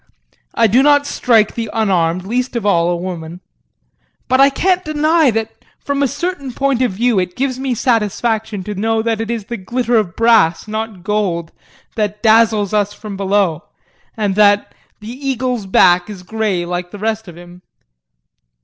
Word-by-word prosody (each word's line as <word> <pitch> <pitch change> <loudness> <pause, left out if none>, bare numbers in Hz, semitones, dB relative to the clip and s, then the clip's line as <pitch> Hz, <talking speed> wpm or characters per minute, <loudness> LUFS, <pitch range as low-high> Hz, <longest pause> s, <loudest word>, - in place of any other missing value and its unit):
I - - +3
do 230 +5 +4
not 290 0 +4
strike 225 -6 +2
the 230 -2 -4
unarmed, 185 -5 0
least 250 +4 -2
of 230 -3 -2
all, 170 -4 +2
a 175 - 0
woman. 175 -1 -6 0.9
But 260 +1 +3
I 275 - +7
can't 365 +6 0
deny 310 0 +2
that 225 -1 -2 0.3
from 280 0 -3
a 280 - +3
certain 290 -1 -4
point 275 -1 0
of 245 -6 +1
view 230 +1 +1
it 180 -1 -3
gives 260 -1 -2
me 265 -2 -2
satisfaction 220 -2 -1
to 210 - -5
know 220 +2 -1
that 225 -1 -1
it 225 - -5
is 230 -3 -3
the 235 +1 -5
glitter 240 +4 -1
of 185 -6 -1
brass, 220 -7 +3
not 215 -3 -5
gold, 190 -5 -1 0.4
that 210 0 -3
dazzles 220 -2 +3
us 205 -1 +1
from 210 -1 -8
below, 195 -4 0 0.5
and 205 -3 0
that 205 0 +3 0.3
the 210 - -9 0.2
eagle's 250 -5 -2
back 180 0 +4
is 195 -3 -9
grey 205 -3 -2
like 175 0 -4
the 205 - -10
rest 220 +1 -3
of 170 -1 -11
him. 175 +1 -14
215 Hz, 175 wpm, -17 LUFS, 190-245 Hz, 0.9 s, I